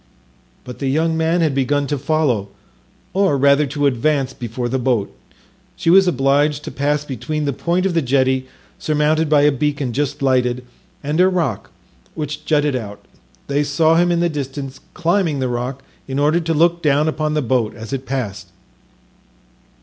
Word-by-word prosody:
But 125 Hz, -, -9 dB
the 140 Hz, -, -2 dB
young 160 Hz, +4 st, +1 dB
man 165 Hz, +2 st, +1 dB
had 155 Hz, -3 st, +2 dB
begun 140 Hz, +2 st, +1 dB
to 145 Hz, +1 st, -2 dB
follow, 140 Hz, -8 st, 0 dB, 0.7 s
or 190 Hz, -6 st, +2 dB
rather 140 Hz, +2 st, +4 dB
to 145 Hz, +1 st, -1 dB
advance 135 Hz, +1 st, +1 dB
before 120 Hz, 0 st, -4 dB
the 130 Hz, +2 st, -1 dB
boat. 120 Hz, -5 st, -1 dB, 0.6 s
She 165 Hz, -, +1 dB
was 190 Hz, +1 st, +6 dB
obliged 145 Hz, -1 st, +2 dB
to -, -, -6 dB
pass 145 Hz, +1 st, -1 dB
between 150 Hz, +2 st, -3 dB
the 140 Hz, -, 0 dB
point 175 Hz, +6 st, -1 dB
of 190 Hz, -, +1 dB
the 165 Hz, -, +2 dB
jetty, 130 Hz, -1 st, +1 dB, 0.3 s
surmounted 155 Hz, +1 st, +1 dB
by 150 Hz, -2 st, +5 dB
a 150 Hz, -, +5 dB
beacon 140 Hz, -2 st, -1 dB
just 145 Hz, +1 st, -2 dB
lighted, 125 Hz, -2 st, +1 dB, 0.4 s
and 150 Hz, +5 st, +1 dB
a 185 Hz, -, +6 dB
rock 165 Hz, -, -2 dB, 0.5 s
which 150 Hz, -1 st, -5 dB
jutted 150 Hz, -3 st, +1 dB
out. 105 Hz, -5 st, -6 dB, 0.4 s
They 140 Hz, +1 st, 0 dB
saw 155 Hz, +3 st, +2 dB
him 175 Hz, +1 st, +3 dB
in 170 Hz, 0 st, +1 dB
the 175 Hz, -, +3 dB
distance 135 Hz, -2 st, -5 dB, 0.2 s
climbing 170 Hz, -3 st, +1 dB
the 130 Hz, -1 st, -1 dB
rock 125 Hz, +2 st, -4 dB, 0.2 s
in 135 Hz, 0 st, -3 dB
order 150 Hz, +4 st, +3 dB
to 165 Hz, -1 st, -1 dB
look 170 Hz, +2 st, +3 dB
down 150 Hz, 0 st, +2 dB
upon 155 Hz, -1 st, -1 dB
the 150 Hz, -, 0 dB
boat 120 Hz, -3 st, 0 dB
as 110 Hz, +1 st, -8 dB
it 135 Hz, 0 st, -4 dB
passed. 125 Hz, -7 st, -4 dB
145 Hz, 175 wpm, -19 LUFS, 130-155 Hz, 0.7 s, was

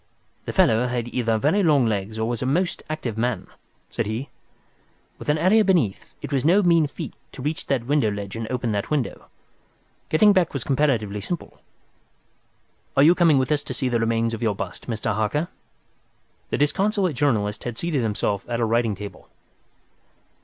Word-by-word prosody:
"The -, -, -3 dB
fellow 115 Hz, +3 st, +3 dB
had 120 Hz, -1 st, -2 dB
either 115 Hz, -3 st, 0 dB
very 150 Hz, -, +2 dB
long 150 Hz, -8 st, +4 dB
legs 110 Hz, 0 st, -2 dB
or 110 Hz, 0 st, -1 dB
was 120 Hz, -1 st, -2 dB
a 130 Hz, -, -1 dB
most 170 Hz, +6 st, 0 dB
active 125 Hz, -8 st, -4 dB
man," 115 Hz, -6 st, -1 dB, 0.5 s
said -, -, -2 dB
he. 115 Hz, +6 st, -4 dB, 0.9 s
"With -, -, -6 dB
an 150 Hz, -, +3 dB
area 195 Hz, +7 st, +4 dB
beneath, 170 Hz, -, 0 dB
it 140 Hz, -, -5 dB
was 135 Hz, -, +1 dB
no 185 Hz, +7 st, +4 dB
mean 170 Hz, -3 st, +4 dB
feat -, -, -7 dB, 0.2 s
to 130 Hz, -, -8 dB
reach 155 Hz, +2 st, -3 dB
that 130 Hz, -4 st, 0 dB
window 140 Hz, -4 st, +2 dB
ledge 100 Hz, -1 st, -5 dB
and 115 Hz, -1 st, -4 dB
open 125 Hz, -2 st, -1 dB
that 100 Hz, -1 st, -2 dB
window. 145 Hz, -5 st, -2 dB, 0.8 s
Getting 205 Hz, +6 st, +5 dB
back 180 Hz, -6 st, +1 dB
was 135 Hz, -, -2 dB
comparatively 120 Hz, -8 st, 0 dB
simple. 170 Hz, -, -6 dB, 1.4 s
Are 135 Hz, -, +7 dB
you 165 Hz, +4 st, +7 dB
coming 170 Hz, -5 st, +4 dB
with 130 Hz, +2 st, 0 dB
us 145 Hz, -1 st, +1 dB
to -, -, -5 dB
see 130 Hz, -, -1 dB
the 120 Hz, -1 st, +1 dB
remains 115 Hz, 0 st, 0 dB
of 115 Hz, -, -5 dB
your 110 Hz, -3 st, +1 dB
bust, -, -, -6 dB
Mr. 110 Hz, -1 st, -2 dB
Harker?" 110 Hz, -, -1 dB, 1.0 s
The -, -, -1 dB
disconsolate 190 Hz, -, +1 dB
journalist 110 Hz, -7 st, 0 dB
had 120 Hz, -2 st, -4 dB
seated 165 Hz, -6 st, -1 dB
himself 105 Hz, -2 st, -1 dB
at 120 Hz, -1 st, -1 dB
a 115 Hz, -, +2 dB
writing 115 Hz, -1 st, +1 dB
table. 100 Hz, +1 st, -9 dB
125 Hz, 180 wpm, -23 LUFS, 110-150 Hz, 1.4 s, Are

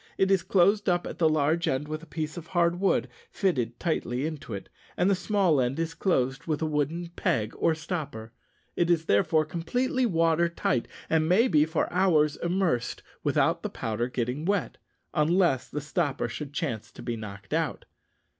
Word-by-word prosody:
It 195 Hz, 0 st, +3 dB
is 190 Hz, -2 st, +4 dB
closed 195 Hz, +3 st, +3 dB
up 175 Hz, 0 st, +1 dB
at -, -, -7 dB
the 160 Hz, -2 st, +4 dB
large 155 Hz, +2 st, +1 dB
end 135 Hz, +3 st, 0 dB
with 155 Hz, +1 st, -4 dB
a 165 Hz, -, -13 dB
piece 155 Hz, -1 st, -4 dB
of 170 Hz, -2 st, -8 dB
hard 170 Hz, 0 st, +1 dB
wood 195 Hz, -, +2 dB, 0.2 s
fitted 125 Hz, -, -1 dB
tightly 135 Hz, -5 st, -1 dB
into 155 Hz, -7 st, -5 dB
it, 95 Hz, -, -8 dB, 0.3 s
and 180 Hz, -, +3 dB
the 200 Hz, -, +4 dB
small 185 Hz, -5 st, +2 dB
end 125 Hz, +2 st, -1 dB
is 165 Hz, 0 st, -2 dB
closed 135 Hz, -7 st, 0 dB
with 155 Hz, -2 st, 0 dB
a -, -, +2 dB
wooden 155 Hz, +3 st, -1 dB
peg 165 Hz, -, -1 dB
or 165 Hz, -, +2 dB
stopper. 145 Hz, -9 st, -5 dB, 0.4 s
It 175 Hz, -1 st, +1 dB
is 165 Hz, -2 st, +2 dB
therefore 155 Hz, +10 st, +3 dB
completely 245 Hz, +11 st, 0 dB
water 165 Hz, -2 st, +2 dB
tight, 125 Hz, -7 st, -1 dB, 0.2 s
and 160 Hz, 0 st, +2 dB
may 220 Hz, +8 st, +5 dB
be 150 Hz, -9 st, +4 dB
for 160 Hz, +1 st, 0 dB
hours 160 Hz, -5 st, +3 dB
immersed 170 Hz, -9 st, -1 dB, 0.2 s
without -, -, +2 dB
the -, -, -3 dB
powder 115 Hz, +2 st, -2 dB
getting 125 Hz, +3 st, -2 dB
wet, 200 Hz, +3 st, -1 dB, 0.3 s
unless 160 Hz, -3 st, +2 dB
the 150 Hz, -, -3 dB
stopper 150 Hz, -2 st, -1 dB
should 140 Hz, +5 st, -6 dB
chance 135 Hz, -8 st, -3 dB
to -, -, -10 dB
be 120 Hz, -1 st, -2 dB
knocked 100 Hz, -3 st, -8 dB
out. -, -, -1 dB
160 Hz, 185 wpm, -27 LUFS, 135-175 Hz, 0.4 s, may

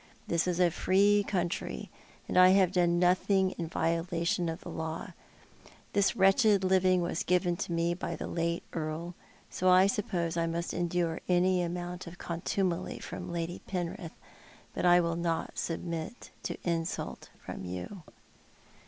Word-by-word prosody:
This 170 Hz, +1 st, 0 dB
is 180 Hz, -1 st, 0 dB
a 175 Hz, -2 st, +4 dB
free 200 Hz, +4 st, +3 dB
country, 170 Hz, -, -2 dB, 0.4 s
and -, -, -4 dB
I 185 Hz, 0 st, +8 dB
have 185 Hz, -3 st, +4 dB
done 175 Hz, -2 st, +2 dB
nothing 185 Hz, +2 st, +3 dB
in 170 Hz, -3 st, -5 dB
violation 170 Hz, +1 st, 0 dB
of 165 Hz, -, -5 dB
the -, -, -8 dB
law. 160 Hz, 0 st, -5 dB, 0.8 s
This 200 Hz, +3 st, +2 dB
wretched 195 Hz, 0 st, +4 dB
living 185 Hz, -1 st, +3 dB
was 170 Hz, -1 st, -2 dB
given 180 Hz, -1 st, +1 dB
to -, -, -4 dB
me 170 Hz, 0 st, +1 dB
by 175 Hz, -1 st, -4 dB
the -, -, -5 dB
late 170 Hz, 0 st, -1 dB
Earl, 160 Hz, +2 st, -4 dB, 0.4 s
so 185 Hz, -, +1 dB
I 185 Hz, +1 st, +7 dB
suppose 180 Hz, -5 st, -1 dB
I 165 Hz, 0 st, +1 dB
must 170 Hz, +1 st, -3 dB
endure 175 Hz, -1 st, -1 dB
any 180 Hz, 0 st, +3 dB
amount 175 Hz, +1 st, -4 dB
of 170 Hz, +1 st, -9 dB
contumely 175 Hz, +1 st, -2 dB
from -, -, -7 dB
Lady 170 Hz, +1 st, -3 dB
Penrith, 180 Hz, -1 st, -4 dB, 0.6 s
but -, -, 0 dB
I 175 Hz, 0 st, +7 dB
will 170 Hz, -1 st, 0 dB
not 170 Hz, -1 st, -2 dB
submit 170 Hz, +6 st, -4 dB
to -, -, -3 dB
insult 165 Hz, -1 st, -3 dB
from -, -, -8 dB
you." 90 Hz, -, -6 dB
175 Hz, 155 wpm, -30 LUFS, 170-185 Hz, 0.8 s, I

